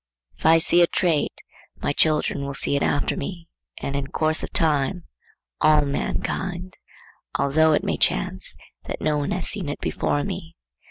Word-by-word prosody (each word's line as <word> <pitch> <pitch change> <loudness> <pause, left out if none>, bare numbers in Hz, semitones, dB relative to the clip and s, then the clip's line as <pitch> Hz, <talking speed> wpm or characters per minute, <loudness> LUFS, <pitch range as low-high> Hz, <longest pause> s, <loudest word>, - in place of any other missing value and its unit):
If - - 0
I 165 +1 +7
see 170 +2 +4
a 170 - +6
trait, 170 -5 0 0.4
my - - -1
children 150 -2 +1
will 140 0 -4
see 140 - +2
it 140 - 0
after 145 - +1
me, 170 +3 -6 0.4
and 140 - -2
in 140 -1 -2
course 155 0 +2
of - - -5
time 160 +2 +1 0.6
all 150 -1 +5
mankind,—although 160 -2 -2
it - - +1
may - - -1
chance - - 0 0.3
that - - -5
no 150 -1 +1
one 145 - -2
has 185 - -1
seen 190 -8 -2
it 145 - -4
before 145 - -1
me. 80 -1 -6
155 Hz, 165 wpm, -23 LUFS, 140-170 Hz, 0.6 s, I